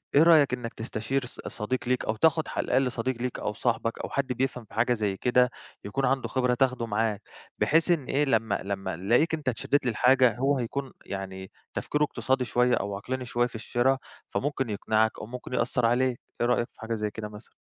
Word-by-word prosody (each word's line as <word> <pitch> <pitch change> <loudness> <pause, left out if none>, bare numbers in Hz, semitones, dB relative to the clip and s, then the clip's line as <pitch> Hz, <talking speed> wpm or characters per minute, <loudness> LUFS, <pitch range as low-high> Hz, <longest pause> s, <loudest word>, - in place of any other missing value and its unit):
إيه 145 - +8
رأيك 155 -6 +6
إنك 120 -2 -4
تستشير 115 +4 -2
ص 125 - -13
صديق 115 +4 -2
ليك 125 0 +1
أو 110 - 0
تاخد 160 +7 +3
على - - -2
الأقل 130 0 +2
صديق 125 +2 -2
ليك 125 0 -2
أو 105 - -2
صاحبك 115 0 -1
أو - - -4
حد 135 -2 -1
بيفهَم 125 -1 -2
في - - -20
حاجة 120 +2 +2
زي 105 -4 -1
كده، 125 +2 +3 0.4
يكون 135 +7 -1
عنده 135 +1 +1
خبرة 125 -1 +1
تاخده 125 -2 +1
معاك، 110 -1 0 0.4
بحيث 165 +3 +3
إن 155 -6 +1
إيه، 145 +3 +1
لمّا 115 -5 +1
لمّا 95 -1 -3
يلاقيك 120 - +2
أنت 155 -4 0
اتشدِّيت 130 +3 0
للحاجة، 125 +1 +4
هو 135 +2 +2
هيكون، 130 +2 -3
يعني، 95 -1 -6 0.2
تفكيره 150 0 0
اقتصادي 130 -1 0
شوية 125 0 +3
أو 100 0 -2
عقلاني 125 +6 -4
شوية 120 0 +1
في 125 - -14
الشّرا، 120 +4 +1 0.3
فممكن 135 -3 -1
يقنِعك 110 +1 +1
أو - - -6
ممكن 125 +2 -8
يأثّر 125 0 +1
عليك. 125 +1 +2 0.2
إيه 120 - +3
رأيك 120 -1 +2
في - - -30
حاجة 115 +1 -3
زي 105 -1 -2
كده 105 0 -6
مثلًا؟ 105 0 -13
125 Hz, 205 wpm, -27 LUFS, 110-130 Hz, 0.4 s, إيه